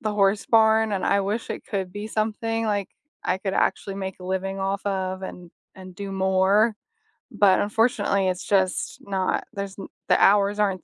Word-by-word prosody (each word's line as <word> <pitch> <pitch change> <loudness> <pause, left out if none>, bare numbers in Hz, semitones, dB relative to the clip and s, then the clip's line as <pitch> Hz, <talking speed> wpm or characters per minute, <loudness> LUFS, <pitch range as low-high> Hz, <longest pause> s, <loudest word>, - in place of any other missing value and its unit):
the 215 -4 -2
horse 200 0 +2
barn 220 -1 +4
and 190 - -1
I 200 0 +3
wish 210 +4 -2
it - - -6
could 190 -3 -3
be 205 +1 -5
something, 225 +1 -1
like, 205 -2 -1 0.4
I 185 - 0
could 195 0 -3
actually 195 - 0
make 190 -1 -5
a - - -9
living 190 +1 -2
off 195 +1 -2
of 190 -1 -2
and 180 -2 -8 0.2
and 185 -1 -11
do 200 0 -6
more. 190 +3 +3 0.6
But 195 -2 +4
unfortunately, 210 -2 +1
it's 180 0 -3
just 190 -2 0
not. 190 -2 -1
There's 200 0 -5
n - - -7 0.2
the - - +3
hours 205 +1 +4
aren't 195 -3 0
195 Hz, 185 wpm, -24 LUFS, 190-210 Hz, 0.6 s, barn